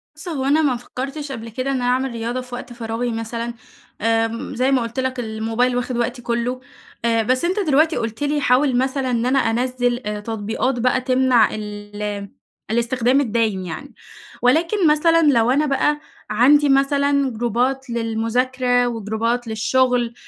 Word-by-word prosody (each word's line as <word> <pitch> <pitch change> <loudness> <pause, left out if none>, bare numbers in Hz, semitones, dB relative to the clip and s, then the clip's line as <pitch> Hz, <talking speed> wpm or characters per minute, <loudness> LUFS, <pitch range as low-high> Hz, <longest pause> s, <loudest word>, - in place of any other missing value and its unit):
بُص 310 +4 -10
هو 285 -6 -2
أنا 290 +3 +3
ما 280 -5 +2
فكرتِش 275 +4 -6
قبل 230 -2 -6
كده 255 +4 -3
إن - - 0
أنا 250 -1 -1
أعمل 255 +1 +1
رياضة 235 +2 -3
في 250 -1 -8
وقت 245 0 -8
فراغي 235 +1 -3
مثلًا، 230 +1 -4 0.5
آمم 225 +1 0
زي 255 +3 +1
ما 260 -2 +3
قُلت 230 +2 -4
لَك 260 -1 -2
الموبايل 225 +2 -1
واخد 245 0 -2
وقتي 240 +1 -2
كُلّه، 240 +1 -2 0.5
آآ 230 -1 +2
بس 255 +7 +1
أنتَ 370 +4 0
دلوقتي 315 -2 +3
قُلت 230 +2 -3
لي 290 0 0
حاول 255 -1 +3
مثلًا 260 0 0
إن 235 -1 0
أنا 265 +2 +3
أنزِل 245 +1 0 0.2
تطبيقات 225 +4 -2
بقى 250 +2 +2
تمنع 255 -3 +3
ال 205 -1 -6 0.4
الاستخدام 240 +3 +2
الدايم 220 -6 0
يعني، 175 - -7 0.5
ولكن 330 - +3
مثلًا 330 +2 +4
لو 250 -6 +4
أنا 290 +4 +2
بَقى 295 +1 +1 0.3
عندي 280 +7 +4
مثلًا 280 0 +2
جروبات 245 +4 -1
للمذاكرة 245 +2 0
وجروبات 230 +1 -2
للشُغل، 240 +2 +1
245 Hz, 155 wpm, -21 LUFS, 230-270 Hz, 0.5 s, مثلًا